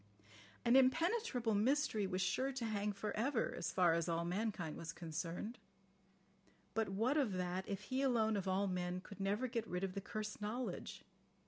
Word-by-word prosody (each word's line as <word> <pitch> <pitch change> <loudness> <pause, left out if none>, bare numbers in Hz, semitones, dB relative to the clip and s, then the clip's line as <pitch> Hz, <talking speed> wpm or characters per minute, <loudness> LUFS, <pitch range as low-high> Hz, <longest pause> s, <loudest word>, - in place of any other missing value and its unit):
"An 235 +1 +5
impenetrable 265 - +3
mystery" 220 -1 +2
was 185 0 -1
sure 265 +6 +1
"to 255 -3 -3
hang 210 -1 0
for 205 +1 -4
ever" 235 +2 +1
as - - -2
far 175 -3 +4
as 170 +1 0
all 170 0 0
mankind 180 -3 -1
was 165 0 -5
concerned. 170 +7 -4 1.1
But 220 0 +1
what 225 +9 +1
of 260 -9 +2
that 180 +1 -2
if 200 0 -2
he 260 +6 -1
alone 225 -5 +3
of 195 -1 -2
all 190 +2 +2
men 180 -1 -1
could 200 +1 -11
never 200 +5 +1
get 230 -2 -2
rid 180 +1 -2
of 190 -1 -1
the 195 - -3
cursed 215 +1 -5
knowledge? 230 +5 -3
210 Hz, 180 wpm, -38 LUFS, 185-240 Hz, 1.1 s, An